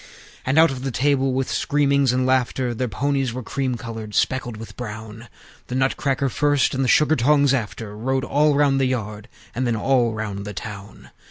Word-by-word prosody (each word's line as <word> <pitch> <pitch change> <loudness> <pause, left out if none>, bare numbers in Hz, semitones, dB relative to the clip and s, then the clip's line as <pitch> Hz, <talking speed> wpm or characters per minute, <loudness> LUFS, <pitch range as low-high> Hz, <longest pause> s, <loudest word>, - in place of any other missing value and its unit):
And 135 +3 +1
out 165 -1 +6
of 130 -1 -6
the 135 - -2
stable, 135 +1 +1
with 130 0 -1
screamings 140 -3 +2
and 130 0 +1
laughter 130 -1 +1
(Their 125 +2 -2
ponies 135 +3 -1
were 130 +1 -5
cream 130 +1 -2
colored, 110 -3 -7
speckled 120 -3 0
with 110 -1 -10
brown), 110 0 -8 0.4
The 125 - -4
Nutcrackers 135 0 0
first, 145 -1 +2
and 135 0 0
the - - 0
Sugar 150 +5 +4
tongs 140 +2 +3
after; 110 -3 -3
Rode 130 +4 -1
all 150 +1 +2
round 140 -1 +3
the - - +3
yard, 105 -4 -4 0.3
and 125 +2 -1
then 120 - +1
all 120 0 +1
round 105 -2 -4
the 105 -1 -7
town. 105 0 -9
130 Hz, 190 wpm, -22 LUFS, 110-135 Hz, 0.4 s, out